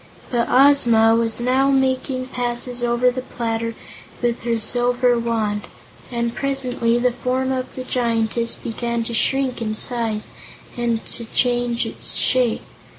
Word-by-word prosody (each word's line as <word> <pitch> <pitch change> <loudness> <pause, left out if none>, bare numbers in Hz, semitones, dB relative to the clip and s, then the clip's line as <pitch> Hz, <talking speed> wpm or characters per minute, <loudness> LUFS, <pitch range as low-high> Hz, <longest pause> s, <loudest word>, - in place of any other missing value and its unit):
But 235 -2 +1
Ozma 240 -4 +5
was 230 0 0
now 260 +3 +2
making 260 -1 0
passes 245 0 -3
over 240 +1 +2
the 255 +1 -4
platter 230 -2 -3 0.4
with 240 -1 -1
her 230 -1 0
silver 245 +2 +1
Wand, 220 -3 -2 0.4
and 235 -1 -1
presently 255 -4 0
the 250 +1 +2
form 255 +2 -1
of 255 -1 -4
the 255 - -5
Giantess 230 -2 0
began 235 0 -3
to 235 - -5
shrink 260 +1 +1
in 215 -1 -2
size 225 -2 +1 0.5
and 235 -2 -1
to 235 - -4
change 240 0 0
its - - 0
shape. 250 -3 +2
240 Hz, 140 wpm, -21 LUFS, 230-255 Hz, 0.5 s, Ozma